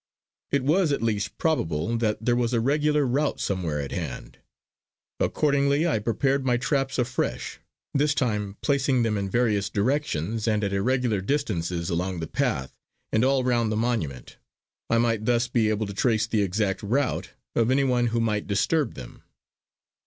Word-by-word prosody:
It 140 -2 +1
was 160 +3 +3
at 140 - -1
least 105 -3 -1
probable 85 - 0
that 110 -1 -1
there 120 - +3
was 120 0 0
a 120 - +3
regular 150 +3 +2
route 140 +4 0
somewhere 85 -6 -1
at 70 -1 -4
hand. 75 -8 -6 0.8
Accordingly 140 +1 +2
I 155 -10 +1
prepared 135 +6 0
my 125 -2 +2
traps 135 0 -1
afresh, 125 0 -2 0.3
this 145 +1 +2
time 105 -6 -1
placing 135 -3 +2
them 110 -2 0
in 100 -1 -2
various 105 -4 +1
directions, 110 - -1
and 105 -1 +1
at 100 -1 -1
irregular 120 0 +1
distances 90 - -1
along 90 +1 -1
the 80 - -3
path 65 -4 -1 0.4
and 110 - +2
all 135 0 +3
round 120 -3 +1
the 110 - 0
monument. 110 - -2 0.5
I 115 - +3
might 115 -2 +1
thus 120 0 +2
be 115 -3 +1
able 110 0 0
to 100 - -6
trace 110 +1 +2
the 110 -1 0
exact 100 0 0
route 125 +6 -1 0.2
of 115 0 +2
anyone 130 -2 +2
who 115 0 0
might 105 -2 0
disturb 125 +7 +1
them. - - -10
115 Hz, 165 wpm, -25 LUFS, 100-135 Hz, 0.8 s, was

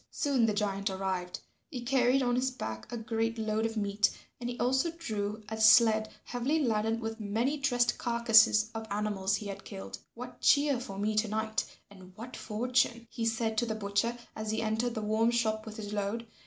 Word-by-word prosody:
Soon 270 -6 +1
the 215 - +1
giant 200 -1 -1
arrived. 190 -2 -3 0.3
He 255 -6 -5
carried 255 +1 +3
on 245 -1 +1
his 255 +1 +1
back 110 - -6
a 240 - -3
great 225 0 -2
load 220 0 0
of 225 0 -6
meat 205 0 +2 0.3
and 240 0 -4
he 245 - -5
also 265 +7 +2
drew 215 -7 -3
a 220 +1 -4
sled 220 0 +6
heavily 255 +6 -1
laden 225 -5 +1
with 225 0 -5
many 225 +7 0
dressed 245 -4 +1
carcasses 225 -2 +4
of 225 -1 -5
animals 200 -1 0
he 210 - -5
had 200 -1 -6
killed. 195 -2 -8 0.2
"What 250 +2 -9
cheer 285 -3 +4
for 195 -6 -7
me 210 +2 0
to 215 +1 +3
night 220 +1 -1 0.3
and 185 -2 -14
what 235 +4 -8
fortune?" 235 +1 0
he 230 -1 -2
said 225 -1 0
to 240 - -1
the 220 - -2
butcher 220 +3 -1 0.2
as 215 0 -4
he 220 +1 -1
entered 225 +2 -1
the 220 - -3
warm 220 +2 +2
shop 220 -2 0
with 215 +1 -8
his 210 -1 -6
load. 210 +3 -2
220 Hz, 195 wpm, -30 LUFS, 210-240 Hz, 0.3 s, sled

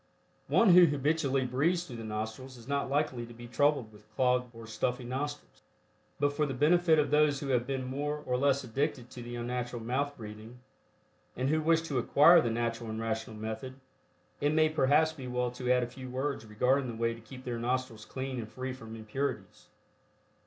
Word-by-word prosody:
One 230 - +4
who 180 0 +9
habitually 140 -2 +1
breathes 155 +8 +1
through 125 -9 -9
the 115 - -7
nostrils 110 +4 -5
is 120 0 -14
not 140 -1 -1
likely 140 -4 0
to 120 - -12
be 120 +1 -10
troubled 130 -3 +1
with 105 +1 -18
clogged 125 -1 +2
or 115 -1 -11
stuffy 120 +3 -2
nostrils, 145 +4 -5 0.6
but 145 0 +2
for 150 0 0
the 135 - -3
benefit 160 +4 +4
of 150 -1 +2
those 150 -1 +4
who 140 - -5
have 125 -2 +1
been 135 -1 -2
more 145 +3 -2
or 125 - 0
less 140 +1 +2
addicted 130 0 -2
to 125 - -8
the 120 0 -7
unnatural 120 0 -3
mouth 140 +5 -1
breathing, 110 +1 -9 0.8
and 130 +2 0
who 155 +1 +2
wish 165 +1 +3
to 145 -6 -1
acquire 160 +7 +6
the 120 - 0
natural 115 0 -2
and 110 0 -4
rational 110 0 -3
method, 110 +4 -5 0.6
it 145 +1 +1
may 155 0 +4
perhaps 155 +1 +3
be 135 -5 -8
well 125 0 -1
to 125 0 -2
add 125 0 +4
a - - 0
few 130 +1 -9
words 130 -3 -3
regarding 125 +5 +1
the 120 - -5
way 115 0 +1
to 115 - -12
keep 130 +3 -11
their 120 -2 -3
nostrils 125 -2 -2
clean 130 +1 -5
and 110 -2 -6
free 130 +1 -4
from 115 -3 -9
impurities. 120 +4 -4
130 Hz, 200 wpm, -31 LUFS, 120-145 Hz, 0.8 s, who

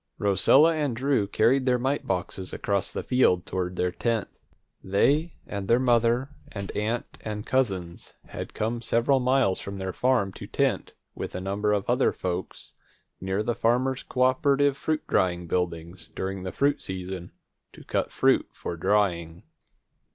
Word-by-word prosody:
Rosella 105 - +5
and 145 -6 -1
Drew 130 -4 +1
carried 130 +6 +2
their 125 -1 +4
mite 135 +4 -1
boxes 95 0 -3
across 100 -1 -1
the - - -4
fields 125 -9 +3
toward 90 -1 -3
their 90 0 0
tent. 115 +3 -1 0.6
They 145 - +2
and 100 -1 -5
their 115 - +5
mother 120 +1 +2 0.2
and 100 -2 -5
aunt 110 +3 -3
and 105 -1 -5
cousins 95 -10 -1
had - - -7
come 115 +2 -2
several 120 +4 +2
miles 125 -6 +2
from 100 0 -6
their 95 -1 -4
farm 120 -7 +1
to - - -9
tent, - - -1 0.2
with - - -6
a - - -2
number 100 +3 -1
of 100 -2 0
other 125 +2 +3
folks, 90 0 -5 0.5
near 95 +3 -1
the 120 - 0
Farmers' 125 +4 +1
Cooperative 135 +2 +2
Fruit 155 +2 -2
Drying 90 -1 +1
buildings, 85 -1 -3
during 95 0 -3
the 95 0 -4
fruit 145 +1 +1
season, 95 -1 -5 0.4
to - - -14
cut - - -1
fruit - - +3
for 85 - -6
drying. 85 -3 0
105 Hz, 155 wpm, -26 LUFS, 95-130 Hz, 0.6 s, Rosella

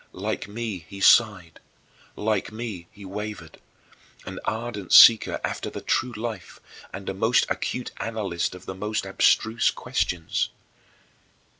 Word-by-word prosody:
Like - - -4
me, 105 -4 -5
he 100 - -9
sighed; 95 -6 +4 0.6
like 105 -1 -1
me, 110 -6 -6
he 100 -1 -13
wavered; 105 +2 -7 0.7
an - - -7
ardent 110 -4 -4
seeker 115 -2 +8
after - - -3
the - - -7
true 125 0 -1
life 110 -4 -6 0.3
and 100 0 -8
a - - -2
most 110 +6 +2
acute 125 - -3
analyst 100 -6 -3
of 90 - -13
the - - -5
most 105 +3 -3
abstruse 110 +1 +2
questions. 85 -2 -2
105 Hz, 130 wpm, -25 LUFS, 95-110 Hz, 0.7 s, seeker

